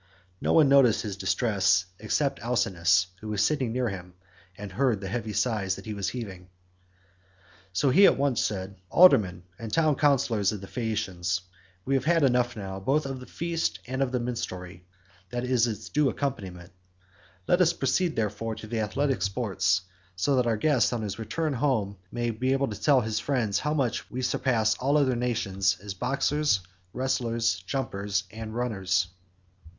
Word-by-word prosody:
No - - +1
one 155 -3 +6
noticed 135 -5 +5
his 105 -3 -4
distress 95 -2 +2
except 135 +6 0
Alcinous, 95 -6 +2
who 110 - -9
was 105 -1 +1
sitting 135 -5 0
near 125 +1 0
him, 90 -2 -8 0.4
and 105 -1 -7
heard 125 0 +1
the 95 - -6
heavy 110 0 -3
sighs 105 -2 0
that - - -11
he 110 - -4
was 100 -2 -2
heaving. 95 -7 -7 1.2
So 110 +9 +2
he 195 +8 +7
at - - +3
once 135 -4 +1
said, 95 -1 -3
"Aldermen 105 - +5 0.2
and 115 -2 -6
town 155 0 +3
councillors 125 -8 +2
of 105 - -5
the 100 - -9
Phaeacians, 95 -6 -2 0.4
we 135 - 0
have 135 -1 +1
had 165 -1 +3
enough 125 -2 +2
now, 95 -2 -5
both 135 +10 +1
of 135 -1 -4
the 125 - -11
feast, 170 -1 -2
and 130 +2 -3
of 135 -2 +1
the 125 - 0
minstrelsy 95 -7 -5 0.4
that 120 0 -3
is 125 -2 +2
its 110 -3 -5
due 150 -1 +2
accompaniment; 95 -11 -4 0.8
let 175 - +3
us 170 -2 +5
proceed 170 0 0
therefore 110 +1 -2
to 110 - -9
the 115 +1 -3
athletic 135 +2 0
sports, 95 -3 +1 0.3
so 135 +10 +1
that 125 -2 +2
our 115 -2 +1
guest 135 +1 +2
on 115 -2 -2
his 105 +1 -4
return 155 +7 -2
home 115 -7 0 0.2
may 120 0 -1
be 130 +4 0
able 135 -1 0
to 105 - -7
tell 140 -4 +4
his 110 -1 -2
friends 120 -6 0
how 150 0 -1
much 130 -6 -1
we 130 +1 -4
surpass 115 -4 +1
all 140 +3 +2
other 135 -4 +2
nations 105 -6 0
as 100 0 -6
boxers, 135 +1 +1 0.3
wrestlers, 115 -6 0
jumpers, 100 -6 -2
and 110 0 -7
runners." 95 -7 0
115 Hz, 175 wpm, -27 LUFS, 100-130 Hz, 1.2 s, he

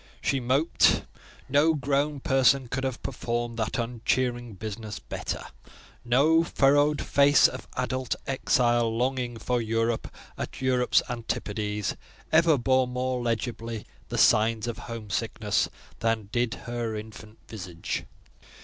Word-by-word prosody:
She 135 - 0
moped: 135 +6 +3 0.4
no 145 +4 +4
grown 140 +1 0
person 135 0 +3
could 130 +2 -3
have 130 -2 -3
performed 120 0 -3
that 110 -2 -1
uncheering 120 0 -1
business 110 +1 -6
better; - - -5 0.6
no 145 +7 +4
furrowed 145 -1 +3
face 140 -1 +5
of 130 - -8
adult 130 0 -1
exile, 120 -3 +2
longing 125 -1 -1
for 120 +2 -1
Europe 115 +1 0 0.3
at - - -5
Europe's 125 -1 +3
antipodes, 105 -4 -3 0.4
ever 160 -1 +5
bore 130 +1 +2
more 125 0 -2
legibly 115 -1 -3 0.2
the - - -3
signs 110 +1 +4
of 120 -1 -4
home 115 -3 -6
sickness 105 0 0 0.3
than 115 -3 0
did 120 -3 0
her 120 -2 -3
infant 110 0 -9
visage. 90 -6 -5
120 Hz, 120 wpm, -27 LUFS, 115-130 Hz, 0.6 s, face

